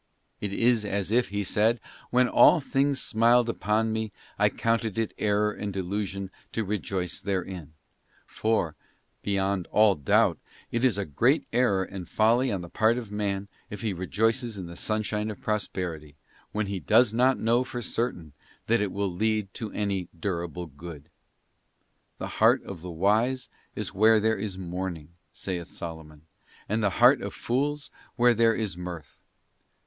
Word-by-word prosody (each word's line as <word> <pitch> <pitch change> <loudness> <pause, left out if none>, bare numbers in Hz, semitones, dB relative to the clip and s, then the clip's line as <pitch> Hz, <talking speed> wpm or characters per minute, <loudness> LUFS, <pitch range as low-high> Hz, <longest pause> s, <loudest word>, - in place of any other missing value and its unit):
'f - - -4
It 100 - -3
is 115 0 +3
as 100 -1 -2
if 120 +2 +3
he 100 +1 -2
said: 110 +4 +2 0.3
when 125 0 +4
all 165 - +6
things 140 -1 +1
smiled 120 +1 +3
upon 110 0 0
me 110 -1 -2 0.3
I - - +5
counted 115 -2 -1
it 115 -2 -1
error 105 0 +2
and 105 -1 -5
delusion 95 0 -3 0.2
to 115 - 0
rejoice 95 -3 -3
therein; 90 -5 -4 0.5
for, 110 -8 0 0.5
beyond 100 -2 0
all 105 -1 +5
doubt, 75 -6 +2 0.3
it 120 +1 -1
is 125 -6 +3
a 100 - -1
great 120 - +2
error 115 -6 +3
and 95 -2 -8
folly 120 +4 +3
on 95 -3 -2
the 85 - -7
part 110 +5 +2
of 115 -4 -6
man 100 -1 -2 0.2
if 105 - -7
he 110 -3 -1
rejoices 110 +5 0
in 95 - -5
the 85 0 -9
sunshine 110 +1 -1
of 105 - -6
prosperity, 90 -8 -3 0.4
when 110 0 -1
he 100 -1 -3
does 110 +3 +4
not 130 +3 +3
know 115 +3 +2
for 120 -2 -6
certain 90 - -3 0.3
that 115 0 +2
it 100 -2 -1
will 100 -1 -1
lead 110 +1 0
to 110 -3 -5
any 100 -4 -2
durable 85 -2 -3
good. 75 0 -10 1.1
'The - - -4
heart - - +3
of 95 -5 -8
the 90 - -7
wise 110 +9 +1 0.3
is - - -4
where 110 +3 +5
there 110 +1 +1
is 100 -3 -4
mourning,' 90 -3 -5 0.2
saith 90 -2 -5
Solomon, 80 -3 -8 0.2
' - - -27
and 110 +2 0
the 105 - +4
heart - - +6
of - - -5
fools 145 +4 -1 0.2
where 120 0 +5
there 115 0 +3
is 105 -5 -2
mirth. 90 -4 -8
105 Hz, 165 wpm, -27 LUFS, 95-115 Hz, 1.1 s, all